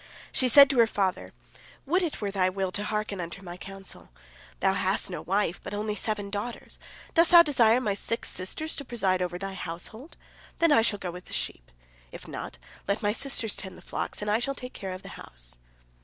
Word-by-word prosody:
She 255 - +4
said 280 +3 +10
to 265 - +1
her 230 - +7
father: 195 -3 -1 0.6
"Would 350 +7 +2
it 340 -4 -2
were 200 -1 -1
thy 185 -2 +2
will 190 0 -2
to 205 +3 -1
hearken 210 -3 -2
unto 175 +3 -6
my 175 -1 -7
counsel. 195 +1 -8 0.5
Thou 190 -1 +3
hast 190 0 +1
no - - -4
wife, 195 -2 0
but 205 - -5
only 210 +1 -1
seven 210 -1 -3
daughters. 210 +4 -5 0.3
Dost 335 -1 +5
thou 345 -1 +10
desire 245 -6 +4
my 210 -6 0
six 230 +3 -1
sisters 250 - -2
to 280 - -4
preside 195 -8 0
over 175 -1 -2
thy 195 +1 -5
household? 190 - -7 0.4
Then 335 -1 +4
shall 220 -2 +1
I - - -21
go 185 - -4
abroad - - -6
with 180 0 -9
the - - -10
sheep. - - -3 0.4
If - - -10
not, - - -6 0.3
let 200 +3 0
my 205 0 +2
sisters 240 -4 -1
tend 190 - -7
the - - -13
flocks, - - -3
and 210 - 0
I 215 - +3
shall 275 +3 -1
take 250 0 -8
care 190 -2 -5
of 185 - -9
the - - -9
house." - - -11
205 Hz, 215 wpm, -28 LUFS, 185-240 Hz, 0.6 s, said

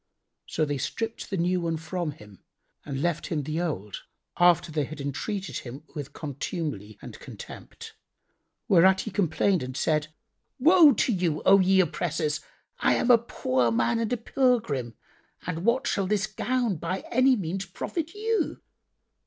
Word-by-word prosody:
[FN#83] - - -14
So 155 - +2
they 145 -1 -2
stripped 225 - -4
the 195 - -2
new 180 +1 +1
one 165 -1 -1
from 165 +1 -3
him 105 -6 -15 0.4
and 140 0 -4
left 170 -2 -1
him 155 -4 -2
the 155 +4 -2
old, 105 - -4 0.4
after 175 -1 +4
they 150 -2 0
had 155 +3 -9
entreated 185 +8 -3
him 130 +4 -9
with 145 -3 -6
contumely 140 - -5
and - - -9
contempt; - - -10 0.7
whereat 190 +1 +5
he 220 - -6
complained 180 0 +1
and 130 +1 -5
said, 155 -1 +1 0.5
"Woe 315 +1 +7
to 240 - +1
you, 175 -5 -1
O 195 +1 +7
ye 190 0 +4
oppressors! 155 -2 -1 0.4
I - - +3
am 250 - +3
a 235 - +7
poor 130 - 0
man 230 - +1
and 230 0 -1
a 245 - +1
pilgrim,[FN#84] 225 - 0 0.5
and 170 0 -3
what 245 +3 +2
shall 195 -2 0
this 205 0 +1
gown 245 -5 -1
by 180 +4 -3
any 255 +2 +5
means 190 -1 -3
profit 325 - -4
you? 435 -4 -1
175 Hz, 160 wpm, -27 LUFS, 150-220 Hz, 0.7 s, Woe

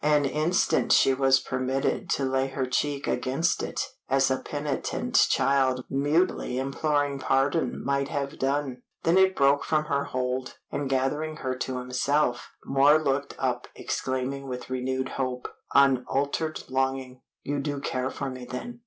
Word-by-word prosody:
An 150 -1 +3
instant 155 +6 +1
she 135 - +6
was 135 0 +4
permitted 130 +1 -1
to 135 - +1
lay 130 0 +1
her 135 -1 -2
cheek 140 +2 -1
against 130 +7 0
it - - -4 0.3
as 135 0 +3
a 130 - +1
penitent 145 -1 0
child 130 -2 +2
mutely 145 -1 +1
imploring 140 +1 0
pardon 135 +5 0
might 140 0 +1
have 140 -1 -4
done. 135 -2 -1 0.2
Then 170 +3 +4
it 190 0 +4
broke 140 +1 +3
from 155 -1 +1
her 140 -1 0
hold, 125 0 -3 0.2
and 145 -2 -2
gathering 145 +4 0
her 130 0 0
to 130 0 -3
himself, 125 0 0 0.2
Moor 140 +2 +5
looked 140 -2 -1
up - - -1
exclaiming 130 +1 -3
with 125 0 -6
renewed 130 +1 -1
hope, 130 -2 -3 0.3
unaltered 140 +3 +2
longing 130 -1 -2 0.2
"You 145 0 -2
do 145 0 -2
care 130 -1 -2
for 135 -1 -4
me, 130 -1 -8
then? 240 - -7
135 Hz, 150 wpm, -27 LUFS, 130-145 Hz, 0.3 s, she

